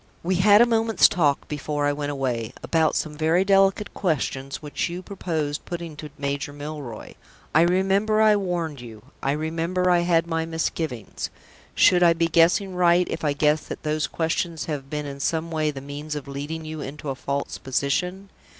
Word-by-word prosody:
We 180 +1 +1
had 205 +4 +7
a - - +5
moment's 225 -1 +4
talk, 150 -5 +1
before 145 0 -2
I 145 - +2
went 145 0 -3
away, 125 -4 -2
about 160 -2 +2
some 150 -1 -2
very 160 +4 +2
delicate 195 +1 +3
questions 140 -6 -2
which 150 +2 -3
you 175 +2 -6
proposed 160 -7 -3
putting 170 -3 -6
to 150 0 -7
Major 140 0 -3
Milroy. 145 -5 -7 0.4
I 155 - +6
remember 195 +5 +2
I 215 -1 +6
warned 170 -8 -2
you; 110 -3 -11 0.2
I 135 - +1
remember 165 +4 0
I 175 - +5
had 170 -1 +2
my 165 -1 -1
misgivings. 160 -7 -3 0.5
Should 180 -1 +5
I 170 -1 +6
be 165 0 +1
guessing 170 +4 +3
right 180 0 +3
if 165 - -4
I 150 -2 +2
guessed 150 +1 +1
that - - -6
those 155 0 0
questions 165 0 -2
have 140 -4 -5
been 150 0 -3
in 140 -1 -7
some 165 +3 -1
way 155 -1 0
the 140 -3 -6
means 145 +2 -6
of 145 -2 -6
leading 145 +4 -5
you 155 -1 -6
into 145 +1 -6
a - - 0
false 140 +1 -3
position? 180 +9 -2
160 Hz, 185 wpm, -24 LUFS, 145-175 Hz, 0.5 s, had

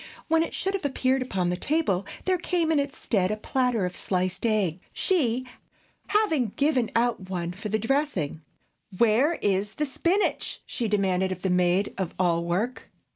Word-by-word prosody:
When 325 0 +3
it 330 - -2
should 385 +1 -1
have 395 - -2
appeared 265 -1 +1
upon 185 -8 -1
the - - 0
table, 200 - 0 0.2
there 370 -1 +2
came 340 -2 0
in 310 - +3
its 280 -1 -3
stead 190 -5 +1
a 215 - -1
platter 245 -3 0
of 180 0 -4
sliced 185 +3 -1
egg, 195 -6 +1
she 255 - +1 0.6
having 320 - +1
given 275 -5 +2
out 230 -5 +1
one 175 -2 -2
for 210 +4 -6
the 220 - +1
dressing. 225 - -1 0.6
"Where 235 - +4
is 200 +1 +1
the 300 - -1
spinach?" 345 +8 0
she 240 -4 -2
demanded 190 -2 +1
of 185 -1 -5
the 190 - +1
maid 180 +2 +2
of 185 -3 -3
all 170 -2 +2
work. 200 +9 -2
220 Hz, 175 wpm, -26 LUFS, 185-285 Hz, 0.6 s, Where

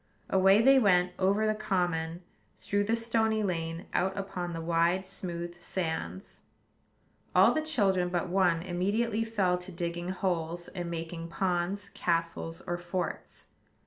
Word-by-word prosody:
Away 195 +3 +5
they 270 +1 +7
went, 180 -5 +4
over 200 +3 +2
the 215 - +2
common, 175 -5 -1 0.3
through 205 0 0
the 225 +2 +2
stony 225 -1 +1
lane, 165 -2 -2
out 190 +2 0
upon 185 -3 -4
the 165 - -4
wide, 170 +3 +1
smooth 175 -2 -5
sands. 175 +2 -4 1.0
All - - +7
the 310 - +1
children 195 - +2
but 175 0 -1
one 175 -2 +2
immediately 205 +5 0
fell 195 -6 +1
to 180 +1 -9
digging 175 0 -3
holes, 175 -2 -2
and 175 -2 -5
making 165 0 -5
ponds, 185 +3 -1
castles, 165 -1 -2
or 175 0 -2
forts. 175 +1 -4
180 Hz, 140 wpm, -30 LUFS, 170-200 Hz, 1.0 s, they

